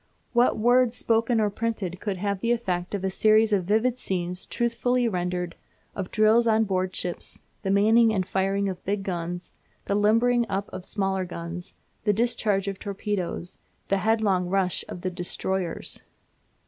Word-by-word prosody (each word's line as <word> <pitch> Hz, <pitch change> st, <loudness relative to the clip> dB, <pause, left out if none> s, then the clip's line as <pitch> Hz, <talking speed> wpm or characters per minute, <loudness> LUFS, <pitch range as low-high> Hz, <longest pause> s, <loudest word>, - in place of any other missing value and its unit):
What 240 Hz, +1 st, +4 dB
words, 245 Hz, +1 st, +4 dB
spoken 230 Hz, +1 st, +2 dB
or 210 Hz, -1 st, +2 dB
printed, 200 Hz, -5 st, -3 dB
could 200 Hz, -3 st, -3 dB
have 200 Hz, +1 st, -1 dB
the 230 Hz, +4 st, 0 dB
effect 185 Hz, -6 st, -1 dB
of 195 Hz, -, -4 dB
a 190 Hz, -, 0 dB
series 215 Hz, +2 st, +4 dB
of 190 Hz, -3 st, +2 dB
vivid 225 Hz, +5 st, +1 dB
scenes 180 Hz, -1 st, -2 dB
truthfully 240 Hz, +1 st, +1 dB
rendered, 180 Hz, -3 st, -2 dB, 0.4 s
of 195 Hz, -2 st, -4 dB
drills 220 Hz, +2 st, +4 dB
on 220 Hz, 0 st, +4 dB
board 185 Hz, -2 st, -1 dB
ship, 175 Hz, -1 st, -2 dB, 0.4 s
the 195 Hz, -, -2 dB
manning 220 Hz, +3 st, +5 dB
and 190 Hz, -4 st, 0 dB
firing 195 Hz, +1 st, 0 dB
of 185 Hz, -2 st, -5 dB
big 200 Hz, 0 st, -1 dB
guns, 175 Hz, -1 st, -4 dB, 0.3 s
the -, -, -1 dB
limbering 230 Hz, +4 st, +3 dB
up 200 Hz, +1 st, -2 dB
of 185 Hz, -, -6 dB
smaller 195 Hz, -2 st, -1 dB
guns, 175 Hz, 0 st, -7 dB, 0.3 s
the 210 Hz, -1 st, +3 dB
discharge 210 Hz, -3 st, +1 dB
of 195 Hz, -1 st, -3 dB
torpedoes, 195 Hz, -3 st, -3 dB, 0.3 s
the 195 Hz, -, +3 dB
headlong 200 Hz, -3 st, +2 dB
rush 190 Hz, -1 st, +1 dB
of 175 Hz, -, -7 dB
the 185 Hz, -, -2 dB
"destroyers"? 180 Hz, 0 st, -3 dB
200 Hz, 160 wpm, -26 LUFS, 185-225 Hz, 0.4 s, manning